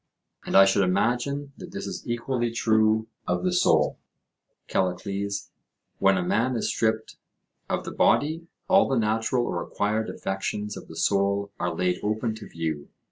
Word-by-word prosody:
And -, -, -1 dB
I 95 Hz, -, +9 dB
should 100 Hz, +1 st, +3 dB
imagine 125 Hz, +9 st, 0 dB
that 180 Hz, -, -9 dB
this 200 Hz, -, -4 dB
is -, -, -6 dB
equally 120 Hz, 0 st, -1 dB
true 110 Hz, -1 st, +2 dB, 0.2 s
of -, -, 0 dB
the 180 Hz, -1 st, +1 dB
soul, 80 Hz, -, +3 dB, 0.7 s
Callicles; 100 Hz, +2 st, -2 dB, 0.5 s
when 95 Hz, 0 st, +4 dB
a 90 Hz, -, 0 dB
man 115 Hz, +8 st, +1 dB
is 115 Hz, -, -1 dB
stripped 110 Hz, -1 st, -1 dB, 0.5 s
of -, -, -1 dB
the -, -, -5 dB
body, 160 Hz, +3 st, +2 dB, 0.2 s
all 195 Hz, +1 st, +5 dB
the 135 Hz, -, +1 dB
natural 115 Hz, +2 st, +1 dB
or -, -, -2 dB
acquired 110 Hz, +2 st, -1 dB
affections 105 Hz, +2 st, -3 dB
of -, -, -9 dB
the 80 Hz, -, -11 dB
soul 100 Hz, +2 st, +1 dB
are 85 Hz, -1 st, -1 dB
laid 90 Hz, +1 st, 0 dB
open 110 Hz, +2 st, -1 dB
to 110 Hz, -, -10 dB
view. 80 Hz, -3 st, -4 dB
110 Hz, 160 wpm, -26 LUFS, 95-120 Hz, 0.7 s, I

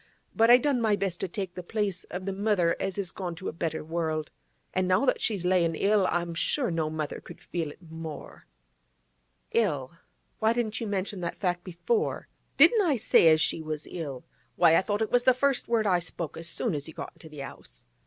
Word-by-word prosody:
But 225 Hz, +1 st, +4 dB
I 245 Hz, -, +10 dB
done 260 Hz, -1 st, +1 dB
my 220 Hz, -2 st, +3 dB
best 195 Hz, -4 st, -2 dB
to -, -, -2 dB
take 185 Hz, 0 st, -5 dB
the 180 Hz, -, -6 dB
place 200 Hz, 0 st, -2 dB
of 185 Hz, +1 st, -6 dB
the 195 Hz, -, -2 dB
mother 195 Hz, -4 st, +2 dB
as 195 Hz, 0 st, -2 dB
is 190 Hz, -4 st, -2 dB
gone 180 Hz, -3 st, -5 dB
to 185 Hz, -, -5 dB
a -, -, -7 dB
better 160 Hz, -1 st, -3 dB
world. 160 Hz, -1 st, -2 dB, 0.4 s
An' 185 Hz, 0 st, +1 dB
now 185 Hz, +7 st, +3 dB
that -, -, +1 dB
she's 200 Hz, -6 st, 0 dB
layin' 175 Hz, -3 st, +2 dB
ill, 200 Hz, +1 st, +3 dB
I'm 175 Hz, -1 st, -1 dB
sure 245 Hz, -, 0 dB
no 160 Hz, -2 st, 0 dB
mother 155 Hz, -2 st, -4 dB
could -, -, -12 dB
feel 165 Hz, -3 st, -4 dB
it 150 Hz, -, -14 dB
more—' 160 Hz, -1 st, -8 dB, 1.0 s
'Ill? 150 Hz, -, +1 dB, 0.5 s
Why 220 Hz, +1 st, +3 dB
didn't 235 Hz, -1 st, -2 dB
you 225 Hz, -, -2 dB
mention 195 Hz, -1 st, -2 dB
that 170 Hz, -, -4 dB, 0.2 s
before?' 430 Hz, -, -1 dB, 0.3 s
'Didn't 455 Hz, -3 st, +7 dB
I 330 Hz, -8 st, +2 dB
say 205 Hz, -, +5 dB
as 155 Hz, -1 st, +6 dB
she 160 Hz, -, 0 dB
was 155 Hz, -1 st, -5 dB
ill? 145 Hz, -7 st, -5 dB, 0.3 s
Why, 165 Hz, -2 st, +5 dB
I -, -, +5 dB
thought 205 Hz, +3 st, -1 dB
it 220 Hz, -, -4 dB
was 245 Hz, 0 st, +3 dB
the 255 Hz, -, +6 dB
first 275 Hz, 0 st, +1 dB
word 230 Hz, -2 st, +2 dB
I 185 Hz, -3 st, +3 dB
spoke 170 Hz, -2 st, -4 dB
as 165 Hz, +1 st, -5 dB
soon 230 Hz, -, -1 dB
as 145 Hz, 0 st, -4 dB
you 160 Hz, -, -11 dB
got -, -, -7 dB
into 160 Hz, -, -14 dB
the 150 Hz, -2 st, -7 dB
'ouse. -, -, -12 dB
185 Hz, 215 wpm, -28 LUFS, 165-215 Hz, 1.0 s, I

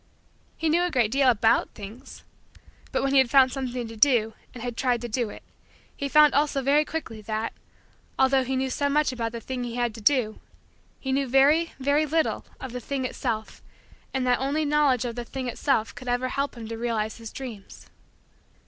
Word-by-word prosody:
He 325 Hz, -, -1 dB
knew 325 Hz, +3 st, +3 dB
a 355 Hz, -, +1 dB
great 240 Hz, -8 st, +1 dB
deal 270 Hz, 0 st, +4 dB
about 225 Hz, -1 st, +3 dB
things. 210 Hz, +3 st, -10 dB, 0.7 s
But -, -, 0 dB
when 275 Hz, -, +1 dB
he 275 Hz, -, +7 dB
had 260 Hz, -2 st, +3 dB
found 260 Hz, 0 st, +6 dB
something 250 Hz, -3 st, -4 dB
to 225 Hz, -, -9 dB
do, 225 Hz, -2 st, +3 dB, 0.2 s
and 240 Hz, -, -9 dB
had 245 Hz, -1 st, -4 dB
tried 245 Hz, -1 st, +1 dB
to 240 Hz, -, -4 dB
do 235 Hz, 0 st, -1 dB
it, -, -, -11 dB, 0.5 s
he 280 Hz, -, -3 dB
found 300 Hz, 0 st, +6 dB
also 285 Hz, -1 st, +1 dB
very 285 Hz, +3 st, +4 dB
quickly 275 Hz, -10 st, -5 dB
that, 215 Hz, +1 st, -3 dB, 0.6 s
although 265 Hz, 0 st, +4 dB
he 265 Hz, +1 st, -2 dB
knew 260 Hz, 0 st, -1 dB
so 285 Hz, +2 st, 0 dB
much 300 Hz, 0 st, +2 dB
about 230 Hz, -2 st, -3 dB
the 235 Hz, -, -5 dB
thing 250 Hz, +2 st, -5 dB
he 240 Hz, -1 st, -5 dB
had 240 Hz, -2 st, 0 dB
to 225 Hz, -, -10 dB
do, 230 Hz, -3 st, +2 dB, 0.6 s
he 265 Hz, -, -3 dB
knew 275 Hz, 0 st, +1 dB
very, 290 Hz, +6 st, +4 dB
very, 285 Hz, +3 st, +1 dB
little 320 Hz, +2 st, 0 dB
of 260 Hz, -, -7 dB
the 250 Hz, -, -4 dB
thing 265 Hz, +2 st, -3 dB
itself 220 Hz, -3 st, -4 dB, 0.5 s
and 265 Hz, -1 st, -1 dB
that 250 Hz, -1 st, +2 dB
only 285 Hz, +4 st, 0 dB
knowledge 285 Hz, -4 st, +2 dB
of 235 Hz, -, -3 dB
the 240 Hz, +1 st, -5 dB
thing 260 Hz, +2 st, -5 dB
itself 240 Hz, -2 st, 0 dB
could 255 Hz, -, -11 dB
ever 245 Hz, +1 st, 0 dB
help 275 Hz, +1 st, -2 dB
him 225 Hz, -1 st, -7 dB
to 225 Hz, 0 st, -5 dB
realize 225 Hz, -2 st, -2 dB
his 230 Hz, -1 st, -9 dB
dreams. 235 Hz, -7 st, -9 dB
255 Hz, 205 wpm, -26 LUFS, 230-275 Hz, 0.7 s, he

